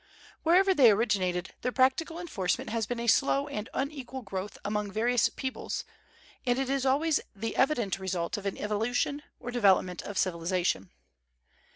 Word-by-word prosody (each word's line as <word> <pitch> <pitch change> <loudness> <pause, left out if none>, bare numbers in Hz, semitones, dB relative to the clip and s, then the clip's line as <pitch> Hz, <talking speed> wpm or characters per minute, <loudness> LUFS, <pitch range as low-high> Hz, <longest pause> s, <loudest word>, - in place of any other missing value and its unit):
Wherever 375 +4 +5
they 265 -9 +7
originated, 195 -5 +1
their 250 - -1
practical 265 +6 +2
enforcement 215 - -2
has 225 -2 -1
been 245 0 -3
a 235 - -3
slow 275 +4 +3
and 220 -7 -5
unequal 270 -2 -4
growth 195 0 -5
among 210 0 -1
various 235 +3 +2
peoples, 260 -2 -4 0.6
and 245 -1 +1
it 270 0 -1
is 270 -1 +1
always 305 +4 +3 0.2
the 225 +3 -4
evident 240 -9 +1
result 185 -2 -2
of 205 -2 -4
an 195 - -3
evolution, 230 +7 -1 0.2
or 245 0 -6
development 190 -6 +3
of 205 - -6
civilization. 170 - 0
230 Hz, 155 wpm, -29 LUFS, 195-270 Hz, 0.6 s, they